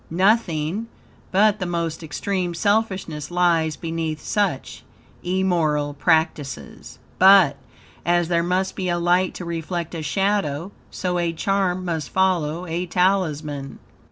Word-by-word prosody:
Nothing, 185 0 +1 0.4
but 210 +2 +3
the 185 - -2
most 170 -2 -2
extreme 175 +3 -3
selfishness 190 -7 -1
lies 170 -3 +2
beneath 160 -2 -3
such 195 -9 -2 0.4
immoral 170 -6 0
practices, 160 -3 -1 0.2
but, 190 -6 +7 0.5
as 175 0 +2
there 170 -1 +2
must 185 +2 -1
be 185 -1 -2
a 175 - +1
light 175 +2 +2
to 180 - -6
reflect 170 0 -4
a 165 - -4
shadow, 190 0 -1 0.2
so 180 -1 -2
a 170 -1 0
charm 185 0 0
must 160 -5 -3
follow 180 -3 +1
a 175 +1 -3
talisman. 155 -7 0
175 Hz, 125 wpm, -22 LUFS, 160-190 Hz, 0.5 s, but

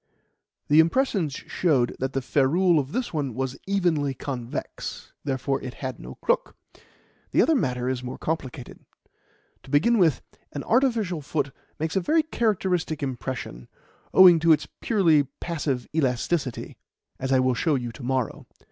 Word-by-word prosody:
The 150 +2 +5
impressions 170 - +2
showed 140 -9 0
that 130 +1 -2
the 135 - -1
ferrule 155 +6 +3
of 135 0 -4
this 250 0 -2
one 140 -7 -2
was 130 0 -2
evenly 165 -8 +1
convex; 125 -3 -6
therefore 135 0 -1
it 125 0 -7
had 130 -2 -5
no - - -9
crook. - - -1 0.7
The - - +4
other 325 - +3
matter 125 - 0
is 130 -1 -1
more 125 0 -6
complicated. 135 -6 -5 0.8
To - - -16
begin 190 - +3
with, 165 -6 +3 0.3
an 145 - -4
artificial 225 - +1
foot 140 -1 -2 0.3
makes 160 +3 -3
a - - +4
very 315 - +2
characteristic 190 - -1
impression, 125 - -5 0.4
owing 180 -3 +8
to 165 +1 +4
its 150 -1 +3
purely 165 -10 +3
passive 145 -7 -2
elasticity, 135 -1 -1 0.4
as 130 0 -2
I 130 - +5
will 130 0 +2
show 150 +5 +1
you 120 -3 -3
to 115 - -12
morrow. 130 -2 -2
145 Hz, 150 wpm, -25 LUFS, 130-175 Hz, 0.8 s, owing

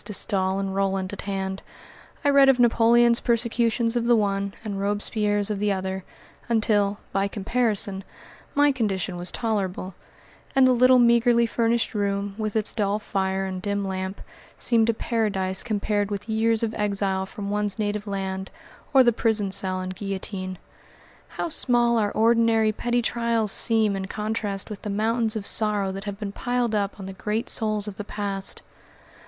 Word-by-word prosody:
De 210 - -7
Staël 190 -1 0
and 195 -1 -3
Roland 195 -1 -1
at 205 - -6
hand, 195 -1 -4 0.6
I 285 - +5
read 275 -1 +6
of 265 - +5
Napoleon's 235 0 +5
persecutions 235 0 0
of 235 -1 0
the 240 - +5
one 200 -2 -1
and 200 -2 -4
Robespierre's 205 0 0
of 205 - -2
the 205 0 +1
other, 190 0 -3 0.5
until, 210 -3 +2
by 195 0 0
comparison, 205 -2 +1 0.5
my 290 0 +4
condition 200 -7 -2
was 175 0 -3
tolerable, 195 -4 -2 0.6
and 265 -1 +6
the 255 - +5
little 255 +1 +5
meagerly 235 0 +4
furnished 230 0 0
room, 200 -1 -1
with 215 -1 -3
its 220 -1 -1
dull 205 -2 0
fire 195 -2 -2
and 185 -1 -5
dim 200 0 -2
lamp, 190 +1 -4 0.4
seemed 230 -2 +2
a - - +3
paradise 200 -5 0
compared 205 -2 -1
with 205 0 -5
years 225 0 +1
of 225 -1 -1
exile 195 -2 -1
from 200 0 -6
one's 205 0 0
native 210 -1 -2
land 190 -1 -4 0.5
or 265 - +8
the 240 -1 +3
prison 215 -3 0
cell 185 -1 +1
and 185 0 -5
guillotine. 190 -1 -5 0.7
How - - -4
small 240 -6 +2
our 205 -1 +1
ordinary, 225 -1 +3
petty 240 +2 -1
trials 230 -3 0
seem 220 -3 +2
in 190 0 -4
contrast 210 -2 -3
with 205 - -7
the 210 - -5
mountains 220 +2 0
of 210 -2 -4
sorrow 210 -3 +1
that 195 +2 -7
have 200 -1 -5
been 205 -2 -4
piled 245 +1 -1
up 205 -1 -1
on 195 - -7
the 195 - -7
great 210 +4 -3
souls 215 -1 +1
of 200 -2 -7
the 205 - -4
past! 200 -1 -4
210 Hz, 170 wpm, -24 LUFS, 195-230 Hz, 0.7 s, or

